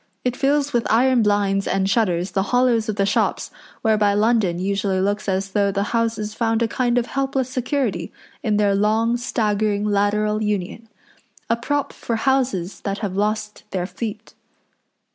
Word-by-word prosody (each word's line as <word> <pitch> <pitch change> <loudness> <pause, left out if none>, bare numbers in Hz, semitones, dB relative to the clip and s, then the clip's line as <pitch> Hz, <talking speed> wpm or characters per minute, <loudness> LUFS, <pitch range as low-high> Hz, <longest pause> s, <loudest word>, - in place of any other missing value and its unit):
It 250 -1 0
fills 285 +2 +1
with 235 -2 +1
iron 250 +2 +4
blinds 205 -2 +1
and 190 0 +1
shutters 185 -4 +1
the 195 - +1
hollows 245 -3 +2
of 215 - -1
the 200 -1 +1
shops 200 - 0 0.3
whereby 210 -2 +3
London 210 -5 +2
usually 195 +1 0
looks 205 +2 -1
as 190 +1 -1
though 200 0 +2
the 200 0 0
houses 225 -2 -1
found 225 0 0
a - - +2
kind 245 +1 0
of 240 - +2
helpless 270 -1 -1
security 255 -2 -1 0.3
in 215 -7 +1
their 205 -1 +3
long, 220 +3 +2
staggering, 215 -4 0
lateral 210 +1 +1
union, 210 +2 -3 0.6
a - - +4
prop 285 +4 -2
for 230 - -3
houses 235 -7 0
that 200 -1 -3
have 190 -2 -4
lost 210 +1 -1
their 185 -2 -2
feet. 220 +3 -6
215 Hz, 160 wpm, -21 LUFS, 200-235 Hz, 0.6 s, iron